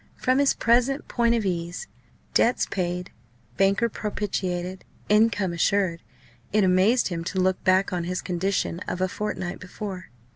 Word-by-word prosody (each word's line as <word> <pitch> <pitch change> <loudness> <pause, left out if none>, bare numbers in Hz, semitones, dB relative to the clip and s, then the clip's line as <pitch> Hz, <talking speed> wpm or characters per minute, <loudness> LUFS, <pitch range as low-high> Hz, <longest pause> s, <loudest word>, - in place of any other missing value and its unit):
From 255 +1 +1
his 280 -1 +3
present 250 +5 +2
point 235 -1 +2
of 225 -3 -1
ease 175 - -3 0.5
debts 240 - +3
paid, 180 -1 -3 0.4
banker 195 +4 +3
propitiated, 190 -4 -3 0.3
income 210 -3 +3
assured 170 0 +1 0.5
it 210 0 +3
amazed 190 +7 +3
him 170 -2 -3
to 190 - -2
look 185 0 +1
back 190 +1 +3
on 175 -1 -1
his 180 +1 -2
condition 180 -1 -1
of 180 - -3
a 185 - +2
fortnight 190 -2 -4
before. 185 0 -7
190 Hz, 145 wpm, -25 LUFS, 180-215 Hz, 0.5 s, his